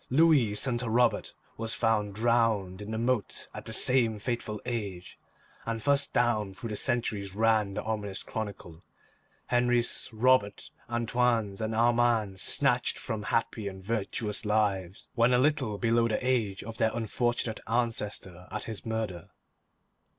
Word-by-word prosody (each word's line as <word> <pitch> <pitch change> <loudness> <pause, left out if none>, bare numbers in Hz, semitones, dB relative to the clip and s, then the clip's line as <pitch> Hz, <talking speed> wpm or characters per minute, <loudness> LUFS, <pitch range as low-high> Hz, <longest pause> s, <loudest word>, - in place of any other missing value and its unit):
Louis, 140 -7 +4
son 120 +2 0
to 120 -1 -2
Robert, 120 +1 +2 0.2
was 115 0 -2
found 105 -3 +1
drowned 110 -4 +1
in 105 - -7
the 110 - -3
moat 120 -1 -1
at - - -8
the - - -5
same 115 -2 +3
fateful 110 -1 -3
age, 100 -7 -5 0.4
and 115 0 -3
thus 140 +4 +2
down 110 -5 0
through 115 +3 -6
the 105 - -3
centuries 105 -5 -1
ran 110 -2 +2
the - - -3
ominous 105 -3 -3
chronicle; 100 -6 -6 0.7
Henris, 120 -1 +2
Roberts, 115 -2 +2 0.2
Antoines, 120 -3 0
and 110 0 -2
Armands 115 -4 +2
snatched 125 -3 +1
from 110 -4 -4
happy 110 -1 -1
and 95 -1 -7
virtuous 105 0 -2
lives 105 -4 -1
when 115 +2 +3
a - - +5
little 130 -6 +1
below 115 +1 +2
the 110 - 0
age 115 -7 0
of 115 +1 -8
their 110 - +3
unfortunate 120 0 -1
ancestor 105 -6 -2
at 105 - -3
his 110 -4 -6
murder. 110 -7 -4
110 Hz, 145 wpm, -29 LUFS, 105-120 Hz, 0.7 s, a